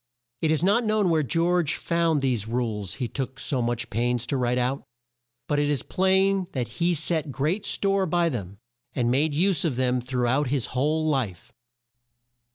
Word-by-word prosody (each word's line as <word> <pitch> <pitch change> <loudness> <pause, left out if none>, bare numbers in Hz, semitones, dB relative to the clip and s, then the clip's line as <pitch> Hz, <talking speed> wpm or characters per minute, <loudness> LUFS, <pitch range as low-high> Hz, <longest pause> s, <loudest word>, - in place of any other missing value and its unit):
It 160 - +1
is 155 +1 +1
not 205 +6 +3
known 215 -4 +2
where 160 -1 +3
George 165 +1 +1
found 165 -3 +1
these 120 -6 0
rules 110 -5 -2
he 130 -3 -3
took 130 +1 -5
so 135 -5 0
much 120 0 -2
pains 120 +2 0
to 140 - -2
write 125 -1 0
out, 125 +2 -1 0.6
but 145 - +1
it 145 0 +1
is 145 -5 -1
plain 190 0 +2
that 125 -3 -2
he 175 +1 +2
set 160 -1 -1
great 165 - -1
store 195 -1 +1
by 175 +1 +2
them, 100 - -4 0.4
and 120 -1 +1
made 145 +3 +1
use 180 0 +2
of 155 -7 0
them 125 0 +1
through 125 0 -1
out 135 +4 +1
his 130 -1 0
whole 155 +5 +1
life. 130 - -2
145 Hz, 180 wpm, -25 LUFS, 125-170 Hz, 0.6 s, not